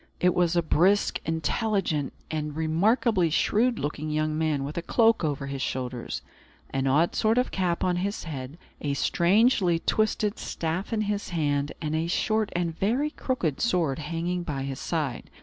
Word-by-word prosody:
It 180 0 +3
was 175 -1 +2
a 170 - +3
brisk, 185 +6 +3
intelligent, 160 - 0 0.2
and 150 -2 -3
remarkably 180 +4 +2
shrewd 225 +9 +2
looking 150 +1 -3
young 155 0 0
man, 155 -3 0
with 145 +2 -5
a 170 - -1
cloak 225 +3 +3
over 145 -3 -1
his 140 -1 -4
shoulders, 125 -1 -3 0.5
an 135 0 0
odd 155 +6 +3
sort 220 +1 +2
of 250 - +1
cap 180 -3 0
on 180 -1 +1
his 200 +4 -2
head, 140 -2 -6 0.2
a 140 -1 -1
strangely 185 - +3
twisted 215 +3 0
staff 165 +6 -3
in 220 -2 0
his 205 -1 -2
hand, 145 -4 0
and 155 0 -1
a 160 +1 0
short 215 +4 +1
and 170 -2 -1
very 250 - 0
crooked 180 - -2
sword 170 - +1
hanging 170 +3 -2
by 145 -5 -3
his 135 -1 -4
side. 150 -7 -3
170 Hz, 165 wpm, -27 LUFS, 150-200 Hz, 0.5 s, It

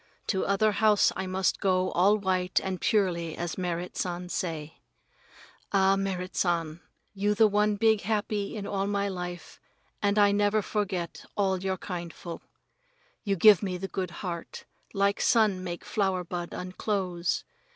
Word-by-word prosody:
To 190 -3 0
other 200 +2 +3
house 210 0 +4
I 190 0 -3
must 185 0 0
go 185 -1 +1
all 200 +4 +4
white 185 -2 +1
and 190 -2 -3
purely 175 -6 +1
as 175 -1 -3
Merrit 180 -1 -3
San 180 0 -3
say. 160 -4 -4 0.9
Ah, 195 -1 +4
Merrit 190 -2 -3
San, 170 -2 0 0.3
you 205 +1 0
the 220 +1 +6
one 210 0 +2
big 220 0 +3
happy 210 -1 -1
in 205 -2 -5
all 195 -1 -1
my 200 0 0
life 180 -2 -6 0.4
and 205 0 +1
I 205 -1 +6
never 205 +1 +2
forget 190 -5 -3
all 190 -2 +1
your 190 0 -1
kindful. 170 -2 -6 0.8
You 200 -2 0
give 205 +1 +7
me 185 -3 -2
the 195 +2 -4
good 190 -2 -3 0.2
heart, 170 -2 -6 0.3
like 200 0 +2
sun 210 -5 +3
make 175 -1 -6
flower 190 -3 0
bud 175 0 -5
unclose. 185 -2 -2
190 Hz, 150 wpm, -28 LUFS, 180-205 Hz, 0.9 s, give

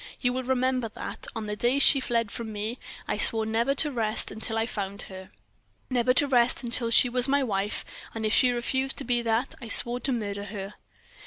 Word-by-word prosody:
"You 245 -1 0
will 260 - -2
remember 255 -2 0
that, - - -6
on 225 -1 -4
the 210 0 -4
day 240 +5 +1
she 280 0 +5
fled 230 -4 -1
from 230 -2 -6
me, 215 +4 -5 0.3
I - - -2
swore 220 -1 +5
never 230 +5 0
to 295 +1 +1
rest 220 -4 -1
until 220 +1 -4
I 225 - +1
found 200 -3 -5
her; 190 -1 -11 0.6
never 250 0 +2
to 290 - +3
rest 250 -1 +2
until 235 0 0
she 230 +2 +6
was 250 +1 +2
my 280 0 +2
wife, 205 -3 -2 0.3
and 220 -1 -3
if 215 - 0
she 255 - +4
refused 260 +2 -1
to - - -3
be 240 -1 0
that, 230 +2 -1
I 235 - -8
swore 240 +2 +5
to 265 +2 -2
murder 205 -4 -4
her!" 200 0 -7
235 Hz, 215 wpm, -26 LUFS, 215-255 Hz, 0.6 s, she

